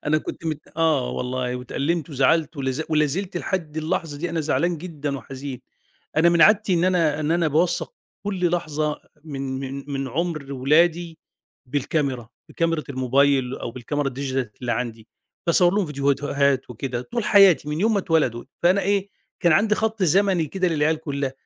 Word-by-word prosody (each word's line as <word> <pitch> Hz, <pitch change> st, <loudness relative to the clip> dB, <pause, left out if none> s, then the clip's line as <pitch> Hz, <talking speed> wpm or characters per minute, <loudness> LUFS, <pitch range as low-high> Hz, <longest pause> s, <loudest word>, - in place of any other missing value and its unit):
أنا 155 Hz, +1 st, +3 dB
كنت 165 Hz, -, -7 dB
مت 155 Hz, -1 st, -2 dB, 0.2 s
آه 155 Hz, -6 st, +2 dB
والله، 125 Hz, 0 st, -2 dB
واتألمت، 145 Hz, +6 st, -2 dB
وزعلت، 150 Hz, +3 st, +2 dB
ولا 135 Hz, -1 st, -1 dB
ز 135 Hz, +5 st, -2 dB
ولا 150 Hz, -1 st, +3 dB
زلت 185 Hz, +5 st, -3 dB
لحد 170 Hz, -4 st, -3 dB
اللحظة 155 Hz, -1 st, -2 dB
دي 175 Hz, +2 st, -3 dB
أنا 165 Hz, -1 st, -1 dB
زعلان 165 Hz, +2 st, 0 dB
جدًا، 150 Hz, -5 st, -4 dB
وحزين، 135 Hz, 0 st, -7 dB, 0.6 s
أنا 165 Hz, +2 st, +5 dB
من 170 Hz, -1 st, +4 dB
عادتي 195 Hz, +3 st, +5 dB
إن 170 Hz, +1 st, +2 dB
أنا 165 Hz, -5 st, +2 dB
إن 150 Hz, 0 st, -1 dB
أنا 170 Hz, -1 st, +2 dB
باوثق 170 Hz, -, +1 dB, 0.3 s
كلّ 185 Hz, -4 st, 0 dB
لحظة 155 Hz, -3 st, -1 dB, 0.2 s
من 135 Hz, -3 st, -4 dB
من 135 Hz, 0 st, -5 dB
من 135 Hz, -1 st, -2 dB
عُمر 155 Hz, 0 st, -3 dB
ولادي 160 Hz, +5 st, +2 dB, 0.5 s
بالكاميرا، 135 Hz, -3 st, -1 dB, 0.2 s
بكاميرة 165 Hz, -2 st, -1 dB
الموبايل، 135 Hz, 0 st, +2 dB
أو -, -, -5 dB
بالكاميرا 135 Hz, +4 st, -2 dB
الdigital 130 Hz, -1 st, -2 dB
اللي 120 Hz, -2 st, -1 dB
عندي، 115 Hz, -1 st, -4 dB, 0.4 s
باصور 175 Hz, +2 st, +4 dB
ليهم 205 Hz, -3 st, +1 dB
فيديوهات 140 Hz, -2 st, 0 dB
وكده 125 Hz, +1 st, -4 dB
طول 235 Hz, -, -3 dB
حياتي، 190 Hz, -9 st, +6 dB
من 150 Hz, +2 st, -2 dB
يوم 220 Hz, +3 st, +3 dB
ما -, -, +2 dB
اتولدوا، 150 Hz, -10 st, 0 dB, 0.2 s
فأنا 185 Hz, +3 st, +4 dB
إيه، 200 Hz, 0 st, 0 dB, 0.3 s
كان 175 Hz, -3 st, +4 dB
عندي 210 Hz, +6 st, +3 dB
خط 220 Hz, -1 st, -1 dB
زمني 185 Hz, -1 st, +3 dB
كده 185 Hz, +3 st, 0 dB
للعيال 155 Hz, 0 st, +1 dB
كلّها، 140 Hz, -3 st, -3 dB
155 Hz, 170 wpm, -23 LUFS, 135-170 Hz, 0.6 s, حياتي